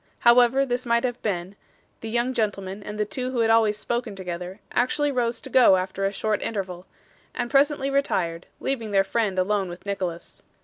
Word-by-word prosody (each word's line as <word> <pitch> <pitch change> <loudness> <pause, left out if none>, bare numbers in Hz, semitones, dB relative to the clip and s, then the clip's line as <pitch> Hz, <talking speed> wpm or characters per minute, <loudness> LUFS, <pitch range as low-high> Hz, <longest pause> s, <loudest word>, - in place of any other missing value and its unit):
However 245 +3 +5
this 245 -1 -2
might 235 -1 +1
have 245 -1 -2
been, 185 -2 -3 0.4
the 225 - -6
young 240 +3 0
gentleman 200 -3 -2
and 210 +1 -7
the 210 - +2
two 250 +5 -3
who 250 -2 0
had 225 0 +3
always 220 -2 +4
spoken 235 -1 -3
together, 180 +1 -6
actually 290 +4 +1
rose 240 -3 -1
to 265 - -7
go 250 -7 +7
after 190 +1 -2
a 195 - +1
short 210 +1 -1
interval, 185 -4 -4 0.5
and 240 -1 -3
presently 280 -1 +3
retired, 180 -12 0
leaving 235 -5 -2
their 195 -1 +3
friend 200 -1 -1
alone 190 0 +1
with 175 +2 -10
Nicholas. 185 -4 -4
215 Hz, 185 wpm, -25 LUFS, 195-245 Hz, 0.5 s, go